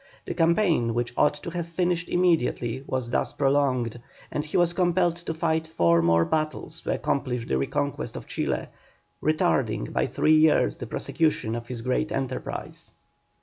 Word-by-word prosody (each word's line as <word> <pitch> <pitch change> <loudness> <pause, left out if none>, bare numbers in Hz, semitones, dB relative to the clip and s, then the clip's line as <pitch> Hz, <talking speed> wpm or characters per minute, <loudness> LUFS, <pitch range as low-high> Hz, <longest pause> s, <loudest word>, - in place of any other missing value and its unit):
The - - -3
campaign 165 - +2
which 120 0 -1
ought 150 - +3
to 160 +3 -7
have 170 -1 -3
finished 175 0 -1
immediately 135 -8 +1
was 130 -2 -2
thus - - 0
prolonged, 130 -4 +1 0.3
and 150 - -1
he 155 - -2
was 175 -1 +3
compelled 175 -1 +2
to 170 -1 -5
fight 160 -1 0
four 85 - +3
more 85 0 +4
battles 155 +1 -2
to - - -2
accomplish 125 -4 -1
the 65 - 0
reconquest 70 - -2
of - - -7
Chile, - - -2 0.5
retarding 140 - +1
by - - +1
three 145 +4 +2
years 155 0 +4
the 120 - -6
prosecution 155 -3 0
of 120 0 -5
his 120 -2 -5
great 130 +5 0
enterprise. 130 -1 -4
150 Hz, 160 wpm, -26 LUFS, 120-165 Hz, 0.5 s, more